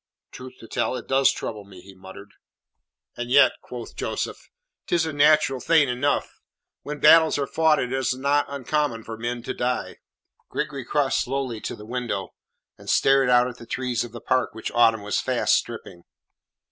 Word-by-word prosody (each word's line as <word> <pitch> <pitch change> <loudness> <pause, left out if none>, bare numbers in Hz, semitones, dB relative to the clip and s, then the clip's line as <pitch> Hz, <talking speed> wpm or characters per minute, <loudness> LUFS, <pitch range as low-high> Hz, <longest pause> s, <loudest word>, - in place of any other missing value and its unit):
"Truth 130 0 -10
to 115 - -11
tell - - -1
it - - -6
does 135 0 +4
trouble 105 -2 -6
me," 100 -2 -14
he 95 +2 -14
muttered. 95 +2 -13 0.8
"And 120 0 -5
yet," 140 +3 +6
quoth 120 -2 -9
Joseph, - - -4 0.4
"tis 170 -2 +1
a 160 - -4
natural 145 -2 +3
thing 160 +1 +3
enough. 130 +4 -1 0.4
When 150 0 -6
battles 160 +2 +6
are 140 - 0
fought 160 +1 +2
it 125 +1 -2
is 130 -1 0
not 140 +2 +1
uncommon 140 -3 -2
for 115 - -7
men 120 +1 -4
to 130 - -4
die." 125 +1 -2 0.5
Gregory 140 -4 -4
crossed 145 0 +1
slowly 130 -4 -3
to - - -5
the 105 - -12
window, 115 -4 -4 0.5
and - - -10
stared 135 -1 +4
out 125 0 +5
at 125 -1 -8
the 115 - -12
trees 125 -1 -2
of 120 - -9
the 120 - -8
park 130 -3 0
which 110 - -5
autumn 115 -3 +3
was 105 - -1
fast - - +1
stripping. 85 - -3
125 Hz, 180 wpm, -24 LUFS, 115-140 Hz, 0.8 s, yet